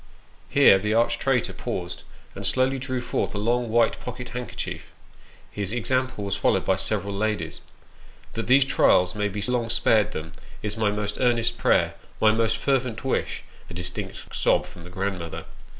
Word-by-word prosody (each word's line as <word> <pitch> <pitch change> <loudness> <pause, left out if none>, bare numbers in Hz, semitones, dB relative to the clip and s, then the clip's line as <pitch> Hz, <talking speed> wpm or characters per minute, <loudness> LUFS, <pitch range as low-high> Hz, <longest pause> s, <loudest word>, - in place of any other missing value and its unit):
Here 95 - +6
the 105 +2 0
arch 115 0 +2
traitor 135 -3 +1
paused, 85 -1 -5 0.3
and - - -7
slowly 130 +1 +1
drew 130 -1 -3
forth 120 -3 -2
a - - -1
long, 120 +3 0
white 115 +1 +3
pocket 125 0 -7
handkerchief 120 -1 -5 0.6
his 100 -1 -2
example 130 -1 -1
was 100 -1 -1
followed 95 -1 +1
by 95 - +2
several 100 0 -2
ladies. 100 -6 -2 0.4
" - - -24
That 115 - -4
these 135 +2 +6
trials 90 -8 +4
may 105 -1 0
be 105 +1 -4
long 120 0 0
spared 110 -1 +3
them 80 +1 -6 0.3
is 105 -1 -3
my 110 -2 +1
most 105 0 -3
earnest 120 -2 +1
prayer, - - +3 0.3
my 110 - +5
most 115 0 +1
fervent 125 -1 0
wish 135 - -1 0.3
(a 85 - -8
distinct 90 -1 -5
sob - - +2
from 85 - -13
the - - -9
grandmother). 90 -3 -4
110 Hz, 170 wpm, -25 LUFS, 100-125 Hz, 0.6 s, Here